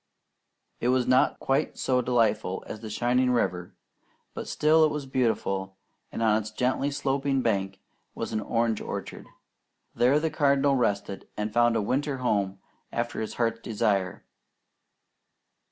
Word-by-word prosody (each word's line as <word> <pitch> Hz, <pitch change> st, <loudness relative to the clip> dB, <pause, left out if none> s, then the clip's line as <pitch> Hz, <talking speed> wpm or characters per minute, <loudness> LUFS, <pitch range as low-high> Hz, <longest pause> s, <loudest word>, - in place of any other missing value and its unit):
It 120 Hz, -, -1 dB
was 125 Hz, 0 st, +3 dB
not 130 Hz, +1 st, +3 dB
quite 135 Hz, +1 st, 0 dB
so 125 Hz, -1 st, +1 dB
delightful 115 Hz, -6 st, +1 dB
as 110 Hz, -, -7 dB
the 110 Hz, 0 st, -8 dB
shining 125 Hz, +4 st, +1 dB
river; 90 Hz, -8 st, -1 dB, 0.6 s
but -, -, -6 dB
still 155 Hz, +1 st, +4 dB
it 155 Hz, -, +5 dB
was 150 Hz, -2 st, -4 dB
beautiful, 100 Hz, -7 st, -1 dB, 0.3 s
and 115 Hz, -, -3 dB
on 110 Hz, -1 st, +4 dB
its 105 Hz, -, -7 dB
gently 125 Hz, +5 st, 0 dB
sloping 140 Hz, -1 st, 0 dB
bank 95 Hz, -3 st, -1 dB, 0.4 s
was -, -, -4 dB
an 110 Hz, -, 0 dB
orange 115 Hz, +1 st, 0 dB
orchard. -, -, -6 dB, 0.7 s
There 130 Hz, +5 st, +3 dB
the 160 Hz, 0 st, -1 dB
Cardinal 140 Hz, -2 st, +3 dB
rested, 100 Hz, -5 st, -1 dB
and 105 Hz, 0 st, -3 dB
found 120 Hz, 0 st, +4 dB
a 110 Hz, -, +1 dB
winter 135 Hz, +5 st, -1 dB
home 100 Hz, -6 st, 0 dB, 0.3 s
after 120 Hz, -1 st, -2 dB
his 110 Hz, -, -4 dB
heart's 115 Hz, -1 st, 0 dB
desire. 105 Hz, -5 st, -1 dB
120 Hz, 145 wpm, -27 LUFS, 105-135 Hz, 0.7 s, it